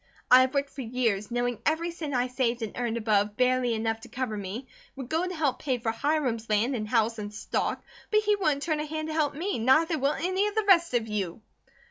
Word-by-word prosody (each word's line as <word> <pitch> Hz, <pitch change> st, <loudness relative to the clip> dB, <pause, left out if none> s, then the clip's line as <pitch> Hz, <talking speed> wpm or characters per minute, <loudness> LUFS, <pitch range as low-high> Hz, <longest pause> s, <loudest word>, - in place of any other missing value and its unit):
I 255 Hz, +1 st, +10 dB
have 260 Hz, +2 st, 0 dB
worked 280 Hz, 0 st, 0 dB
for 270 Hz, -, -7 dB
years, 225 Hz, -4 st, -1 dB
knowing 245 Hz, -1 st, -1 dB
every 330 Hz, +2 st, 0 dB
cent 310 Hz, -5 st, -5 dB
I 245 Hz, 0 st, +2 dB
saved 250 Hz, -2 st, -1 dB
and 220 Hz, -, -5 dB
earned 235 Hz, -1 st, -1 dB
above 210 Hz, -2 st, +1 dB
barely 250 Hz, -2 st, +2 dB
enough 225 Hz, 0 st, -1 dB
to -, -, -12 dB
cover 255 Hz, -4 st, -3 dB
me, 205 Hz, +6 st, -6 dB, 0.3 s
would 265 Hz, -2 st, -7 dB
go 330 Hz, +3 st, 0 dB
to 365 Hz, -, -5 dB
help 300 Hz, -5 st, 0 dB
pay 260 Hz, -4 st, -1 dB
for 225 Hz, -1 st, -1 dB
Hiram's 245 Hz, -3 st, -1 dB
land 220 Hz, +5 st, +2 dB
and 215 Hz, -2 st, -4 dB
house 225 Hz, -1 st, +1 dB
and 205 Hz, 0 st, -5 dB
stock; 210 Hz, -, -2 dB, 0.3 s
but 425 Hz, 0 st, +4 dB
he 420 Hz, -1 st, +2 dB
wouldn't 305 Hz, -8 st, 0 dB
turn 310 Hz, -3 st, 0 dB
a 300 Hz, -, -2 dB
hand 310 Hz, +1 st, -4 dB
to -, -, -3 dB
help 300 Hz, -3 st, 0 dB
me, 345 Hz, -, -2 dB
neither 310 Hz, +7 st, +3 dB
will 275 Hz, +2 st, +2 dB
any 375 Hz, +5 st, 0 dB
of 420 Hz, -, -5 dB
the 435 Hz, -1 st, +1 dB
rest 340 Hz, -8 st, +5 dB
of 230 Hz, -2 st, +1 dB
you." 205 Hz, -2 st, -3 dB
255 Hz, 235 wpm, -27 LUFS, 225-310 Hz, 0.3 s, I